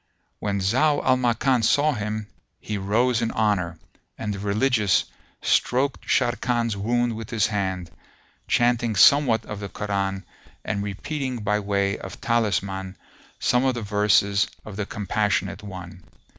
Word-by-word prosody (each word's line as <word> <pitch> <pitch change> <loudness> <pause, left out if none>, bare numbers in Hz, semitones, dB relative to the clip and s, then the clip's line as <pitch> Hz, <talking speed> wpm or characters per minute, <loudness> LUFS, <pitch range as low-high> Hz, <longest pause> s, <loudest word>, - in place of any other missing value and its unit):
When 100 -1 -1
Zau 140 +10 +2
al 130 - +5
Makan 125 0 +1
saw 145 +7 +3
him, 105 -2 -3 0.3
he 105 - -5
rose 115 +5 +1
in 115 - 0
honour; 90 -6 0 0.4
and 105 -2 -3
the 100 - -6
Religious 105 0 +2 0.4
stroked 130 +1 +1
Sharrkan's 120 -1 +1
wound 120 +3 0
with 110 -1 -7
his 110 -4 +1
hand, 95 -4 -2 0.6
chanting 120 -2 +2
somewhat 120 0 +5
of 105 - -6
the 100 -1 -6
Koran 95 -1 -2 0.4
and 100 - -2
repeating 125 +4 -4
by 105 0 +1
way 100 -1 0
of 95 - -9
talisman 100 -4 -1 0.4
some 125 +1 +2
of 130 -1 +1
the 120 - -4
verses 100 0 +3 0.2
of 105 - -8
the 100 0 -3
Compassionate 105 0 -1
One. 90 -3 -9
105 Hz, 140 wpm, -24 LUFS, 100-120 Hz, 0.6 s, al